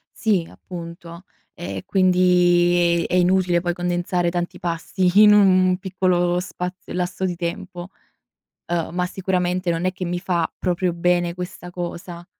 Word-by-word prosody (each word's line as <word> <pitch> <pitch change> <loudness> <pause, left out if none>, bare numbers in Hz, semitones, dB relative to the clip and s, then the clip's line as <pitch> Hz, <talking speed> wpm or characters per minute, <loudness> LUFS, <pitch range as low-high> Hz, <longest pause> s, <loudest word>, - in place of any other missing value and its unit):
Sì, 195 -7 0
appunto. 170 0 -10 0.3
E 175 - -6
e - - -6
quindi 175 -2 +3
è - - -6
è - - +4
inutile 180 -1 +3
poi 175 -1 -1
condensare 175 0 -1
tanti 175 0 -3
pasti 180 +3 +1
in 210 -1 +8
un 185 -2 +4
piccolo 180 -2 0
spazio 180 0 -6
lasso 180 +1 -2
di 180 -2 -2
tempo; 175 +1 -5 0.8
uhm, 170 -2 -1
ma 180 0 0
sicuramente 180 -1 -1
non 165 +2 -2
è 185 - +1
che 185 - -6
mi 175 +1 -2
fa 175 -3 -1
proprio 180 0 0
bene 175 0 +1
questa 180 0 -7
cosa, 175 0 -7
180 Hz, 150 wpm, -22 LUFS, 175-185 Hz, 0.8 s, in